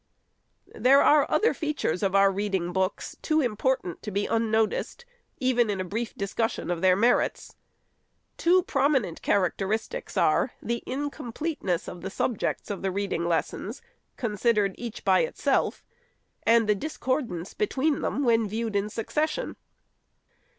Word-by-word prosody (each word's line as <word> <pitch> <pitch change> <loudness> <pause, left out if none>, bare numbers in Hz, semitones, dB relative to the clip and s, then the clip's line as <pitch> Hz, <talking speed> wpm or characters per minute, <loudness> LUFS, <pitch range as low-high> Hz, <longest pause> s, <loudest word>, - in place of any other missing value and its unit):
There 275 +2 +5
are 295 -1 +5
other 450 - +3
features 300 - -2
of 195 -1 +1
our 195 0 +6
reading 190 -3 -2
books 190 +1 -2
too 310 0 +2
im 240 -4 -1
portant 255 -6 -1
to 210 - -5
be 205 0 -1
unnoticed, 225 - 0 0.3
even 250 -4 +2
in 200 -2 -1
a - - 0
brief 220 +5 -4
discussion 200 -1 -2
of 170 -1 -2
their 185 -1 +5
merits. 235 +5 +1 0.8
Two 360 +2 +3
prominent 270 - +1
characteristics 200 - -1
are, - - +2
the 235 0 -3
in 285 +3 -2
completeness 240 - -3
of 175 - -7
the 190 - -4
subjects 210 0 -2
of 200 - -4
the 195 - 0
reading 190 -3 -2
lessons, 170 - -2 0.3
con 230 -5 -2
sidered 210 -2 +2
each 235 -1 -7
by - - +5
itself; 485 - 0 0.6
and 230 -1 +5
the 210 - +5
discordance 255 - -3
between 310 -8 0
them, 285 - -1
when 230 -3 +3
viewed 220 0 -3
in 200 +1 0
succession. 305 - -2
225 Hz, 145 wpm, -27 LUFS, 195-265 Hz, 0.8 s, our